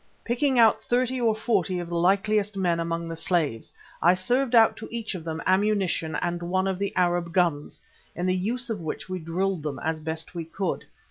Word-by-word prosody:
Picking 255 Hz, +3 st, +1 dB
out 225 Hz, -2 st, +5 dB
thirty 250 Hz, +2 st, 0 dB
or 225 Hz, -2 st, +3 dB
forty 200 Hz, -5 st, 0 dB
of 175 Hz, -1 st, -4 dB
the 170 Hz, -, -4 dB
likeliest 200 Hz, +3 st, +2 dB
men 175 Hz, -3 st, +1 dB
among 165 Hz, 0 st, -2 dB
the 165 Hz, -, -5 dB
slaves, 160 Hz, -8 st, -1 dB, 0.3 s
I 175 Hz, +2 st, +5 dB
served 245 Hz, +6 st, +1 dB
out 225 Hz, -1 st, +6 dB
to 220 Hz, -, -8 dB
each 230 Hz, -2 st, -4 dB
of 180 Hz, -4 st, -6 dB
them 160 Hz, 0 st, -4 dB
ammunition 190 Hz, -5 st, +1 dB
and 175 Hz, +1 st, -2 dB
one 185 Hz, +2 st, 0 dB
of 190 Hz, -1 st, -1 dB
the 200 Hz, 0 st, -1 dB
Arab 175 Hz, -1 st, +1 dB
guns, 170 Hz, -5 st, 0 dB, 0.4 s
in 175 Hz, -, -2 dB
the 185 Hz, 0 st, +2 dB
use 235 Hz, +6 st, -1 dB
of 215 Hz, -, -3 dB
which 155 Hz, -2 st, -5 dB
we 185 Hz, 0 st, -4 dB
drilled 180 Hz, +2 st, -1 dB
them 145 Hz, -3 st, -4 dB
as 160 Hz, 0 st, -1 dB
best 160 Hz, +1 st, -5 dB
we 170 Hz, -2 st, -4 dB
could. 185 Hz, +3 st, -3 dB
185 Hz, 205 wpm, -26 LUFS, 170-215 Hz, 0.4 s, out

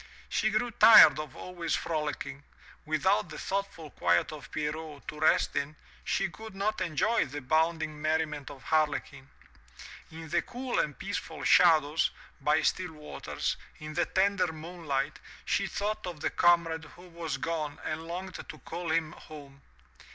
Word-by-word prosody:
She 220 Hz, -, +1 dB
grew 220 Hz, +3 st, 0 dB
tired 180 Hz, -10 st, +9 dB
of 150 Hz, -3 st, -6 dB
always 175 Hz, -2 st, -3 dB
frolicking. 150 Hz, -3 st, -3 dB, 0.5 s
Without 175 Hz, +4 st, +2 dB
the 155 Hz, -, -8 dB
thoughtful 195 Hz, -6 st, -4 dB
quiet 85 Hz, -, +2 dB
of 145 Hz, -3 st, -9 dB
Pierrot 150 Hz, -1 st, -5 dB
to 150 Hz, -, -6 dB
rest 155 Hz, -, +3 dB
in, 150 Hz, +2 st, -2 dB, 0.3 s
she 195 Hz, -, 0 dB
could 220 Hz, +3 st, -11 dB
not 205 Hz, +1 st, -1 dB
enjoy 185 Hz, +7 st, +1 dB
the 145 Hz, +3 st, -6 dB
bounding 155 Hz, +2 st, 0 dB
merriment 155 Hz, -2 st, -1 dB
of 135 Hz, -, -11 dB
Harlequin. 145 Hz, -3 st, 0 dB, 0.8 s
In 160 Hz, 0 st, -9 dB
the 175 Hz, +2 st, +2 dB
cool 250 Hz, +1 st, -3 dB
and 150 Hz, -, -1 dB
peaceful 200 Hz, +1 st, -5 dB
shadows, 160 Hz, -3 st, +5 dB, 0.3 s
by 150 Hz, +3 st, +2 dB
still 180 Hz, -3 st, 0 dB
waters, 150 Hz, -1 st, -4 dB, 0.2 s
in 155 Hz, 0 st, -8 dB
the 175 Hz, +2 st, +1 dB
tender 190 Hz, -2 st, +2 dB
moonlight, 155 Hz, -3 st, -3 dB, 0.3 s
she 195 Hz, -, +1 dB
thought 205 Hz, -1 st, -3 dB
of 175 Hz, -4 st, -6 dB
the -, -, 0 dB
comrade 170 Hz, -2 st, +3 dB
who 180 Hz, +1 st, -14 dB
was 165 Hz, -4 st, -4 dB
gone 155 Hz, 0 st, -3 dB
and 160 Hz, +1 st, -4 dB
longed 185 Hz, +2 st, -5 dB, 0.2 s
to -, -, -8 dB
call 175 Hz, -1 st, -6 dB
him 160 Hz, -1 st, +1 dB
home. 140 Hz, -4 st, -12 dB
160 Hz, 150 wpm, -29 LUFS, 150-180 Hz, 0.8 s, tired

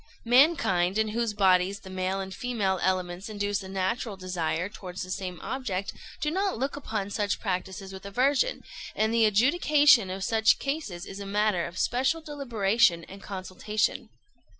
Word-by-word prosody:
"Mankind, 230 Hz, -, +4 dB
in 220 Hz, 0 st, +1 dB
whose 225 Hz, -1 st, -1 dB
bodies 190 Hz, 0 st, +3 dB
the 190 Hz, -, -11 dB
male 185 Hz, +1 st, -2 dB
and 190 Hz, 0 st, -5 dB
female 205 Hz, -7 st, -1 dB
elements 185 Hz, +1 st, -1 dB
induce 205 Hz, -1 st, -2 dB
a 190 Hz, -, -9 dB
natural 195 Hz, +3 st, -2 dB
desire 180 Hz, -2 st, -2 dB
towards 185 Hz, -3 st, -7 dB
the 185 Hz, -, -7 dB
same 185 Hz, -2 st, -4 dB
object, 200 Hz, -8 st, -3 dB, 0.3 s
do 300 Hz, -, 0 dB
not 385 Hz, -, 0 dB
look 270 Hz, +4 st, -2 dB
upon 215 Hz, -8 st, -4 dB
such 205 Hz, -1 st, -1 dB
practices 190 Hz, -1 st, -4 dB
with 190 Hz, -, -9 dB
aversion; 260 Hz, -, +1 dB, 0.3 s
and 220 Hz, +1 st, +1 dB
the 230 Hz, -1 st, +4 dB
adjudication 285 Hz, -, +4 dB
of 190 Hz, +1 st, -4 dB
such 220 Hz, +2 st, +3 dB
cases 275 Hz, -, -4 dB
is 195 Hz, -, -8 dB
a 200 Hz, -, -6 dB
matter 205 Hz, -3 st, +1 dB
of 175 Hz, -, -10 dB
special 265 Hz, -, +1 dB
deliberation 235 Hz, -, +1 dB
and 195 Hz, +3 st, -12 dB
consultation. 200 Hz, +2 st, -2 dB
200 Hz, 160 wpm, -27 LUFS, 185-240 Hz, 0.3 s, Mankind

